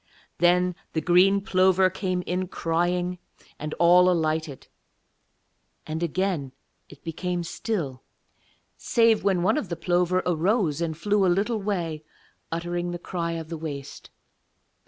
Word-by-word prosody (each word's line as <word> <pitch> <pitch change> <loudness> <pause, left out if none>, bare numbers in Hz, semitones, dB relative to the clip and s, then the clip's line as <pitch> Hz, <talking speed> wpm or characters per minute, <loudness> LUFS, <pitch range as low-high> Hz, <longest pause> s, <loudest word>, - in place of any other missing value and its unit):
Then 180 +1 +3 0.2
the 160 - +1
green 185 +4 +4
plover 185 -2 +3
came 185 -1 -2
in 180 +1 -2
crying, 175 +1 -1 0.4
and 150 +1 -5
all 180 +1 +6
alighted. 155 -4 -1 1.2
And 160 +1 -4
again 170 -5 -1 0.4
it 145 - -15
became 175 +1 -3
still, 165 - -3 0.8
save 230 -2 +3
when 190 -3 +2
one 185 - +3
of 205 - -6
the 170 - -3
plover 180 +1 +1
arose 175 -2 +1
and 160 -2 -2
flew 205 +3 +1
a - - +4
little 210 +5 0
way 170 -6 -2 0.5
uttering 175 +1 -2
the 175 - -4
cry 170 -1 -3
of 165 -1 -6
the 165 -2 -5
waste. 145 -4 -7
175 Hz, 135 wpm, -25 LUFS, 165-185 Hz, 1.2 s, all